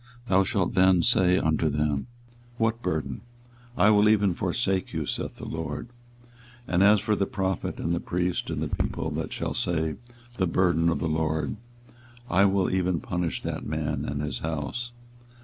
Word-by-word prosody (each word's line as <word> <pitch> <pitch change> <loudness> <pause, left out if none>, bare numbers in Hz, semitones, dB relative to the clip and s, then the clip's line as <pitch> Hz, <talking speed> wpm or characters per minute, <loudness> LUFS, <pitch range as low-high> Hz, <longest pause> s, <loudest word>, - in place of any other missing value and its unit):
thou 95 -1 +4
shalt 95 -3 0
then 95 -2 +5
say 95 -6 +4
unto 80 -1 +1
them, 75 - -1 0.5
What 115 0 0
burden? 75 - -2 0.6
I 105 - +6
will 105 0 +5
even 105 -3 +3
forsake 95 +2 -1
you, - - -2
saith - - -3
the - - -8
LORD. 80 +6 -5 0.8
24:023:034 - - -7
And 90 - +4
as 105 +1 +6
for 105 +1 0
the 100 - +1
prophet, 95 -1 -2
and 85 - -1
the 85 - 0
priest, 90 0 -2
and - - -2
the - - -1 0.2
people, - - -3
that - - -3
shall - - -3
say, 80 -3 -1 0.4
The 95 - +1
burden 85 -1 +2
of 85 - +1
the 85 - -2
LORD, 80 +4 -1 0.7
I 95 +3 +5
will 95 -1 +2
even 90 -2 +1
punish 90 -1 -3
that - - -3
man 75 0 -2
and 70 +1 -3
his 75 - -3
house. 80 +10 -3
90 Hz, 175 wpm, -26 LUFS, 80-95 Hz, 0.8 s, I